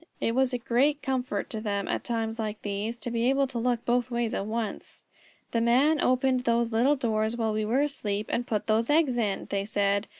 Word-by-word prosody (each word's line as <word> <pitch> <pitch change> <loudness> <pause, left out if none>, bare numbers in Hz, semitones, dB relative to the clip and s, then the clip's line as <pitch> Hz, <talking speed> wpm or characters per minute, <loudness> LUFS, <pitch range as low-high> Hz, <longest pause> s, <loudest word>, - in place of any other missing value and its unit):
It 230 - 0
was 260 +1 +2
a 250 - 0
great 270 +5 +1
comfort 255 -6 -2
to 220 - -4
them 200 -2 -2
at - - -2
times 225 -1 -2
like 215 -1 -4
these 205 +3 -3
to 240 0 -5
be 235 +1 +1
able 275 +1 +3
to 255 -3 -4
look 240 -1 0
both 245 +1 +1
ways 235 -2 -1
at 195 - -2
once. 220 -1 -4 0.5
"The 230 - +1
Man 270 +7 +3
opened 255 0 +2
those 235 -1 +1
little 245 +6 +3
doors 220 -3 -1
while 220 -2 0
we 215 0 -1
were 250 +6 +2
asleep, 210 -8 -2
and 240 - -1
put 215 -3 -1
those 225 +1 +1
eggs 290 -5 +3
in," 205 -4 -1
they 200 -1 0
said. 200 0 0
235 Hz, 220 wpm, -27 LUFS, 215-250 Hz, 0.5 s, able